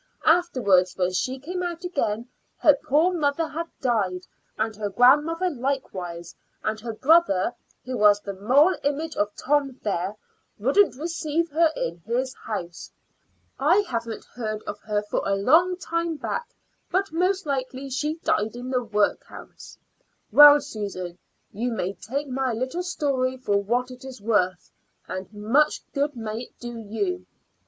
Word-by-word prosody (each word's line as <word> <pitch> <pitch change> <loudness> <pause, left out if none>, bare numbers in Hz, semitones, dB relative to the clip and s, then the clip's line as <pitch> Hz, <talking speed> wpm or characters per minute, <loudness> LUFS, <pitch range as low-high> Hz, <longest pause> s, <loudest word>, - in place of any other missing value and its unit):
Afterwards, 245 - +3
when 180 -1 +1
she 255 +8 -1
came 355 +7 -5
out 350 0 -4
again, 235 -10 -1 0.3
her 300 - +6
poor 315 +7 +3
mother 315 -1 0
had 330 +2 -4
died, 205 -8 0 0.4
and 220 0 -1
her 205 -1 -3
grandmother 295 - +4
likewise; 190 - -4 0.3
and 215 0 -1
her 225 +1 -5
brother, 265 - +3 0.3
who 255 0 -4
was 205 -1 +6
the 200 -1 -6
moral 265 - +4
image 300 +3 -1
of 205 0 -1
Tom 275 -2 0
there, 195 0 -1 0.4
wouldn't 275 - +3
receive 325 +1 -2
her 320 +1 +3
in 170 +1 -3
his 240 +9 -2
house. 180 -9 -6 0.7
I 340 +9 +4
haven't 230 -2 -4
heard 215 -3 -5
of 205 - -6
her 210 -1 -2
for 210 - -2
a 195 - +1
long 340 - +4
time 335 -1 -2
back, 475 - -4 0.3
but 380 +1 0
most 365 +3 +1
likely 270 -1 -3
she 300 +4 -1
died 215 +2 0
in 250 +1 -6
the 250 -1 +1
work 210 -2 +1
house. - - -12 0.5
Well, 295 0 +9
Susan, 200 -9 -6 0.3
you 235 +4 -2
may 195 -4 -2
take 275 +9 -4
my 260 -1 -1
little 260 +9 -2
story 270 -7 -1
for 205 -6 +1
what 245 +5 -1
it 255 +1 -11
is 265 -2 -9
worth, 195 -4 0 0.4
and 185 +1 -6
much 230 +9 +1
good 285 0 0
may 225 +1 -5
it - - -24
do 240 -1 -7
you." 360 - -3
255 Hz, 155 wpm, -25 LUFS, 210-300 Hz, 0.7 s, Well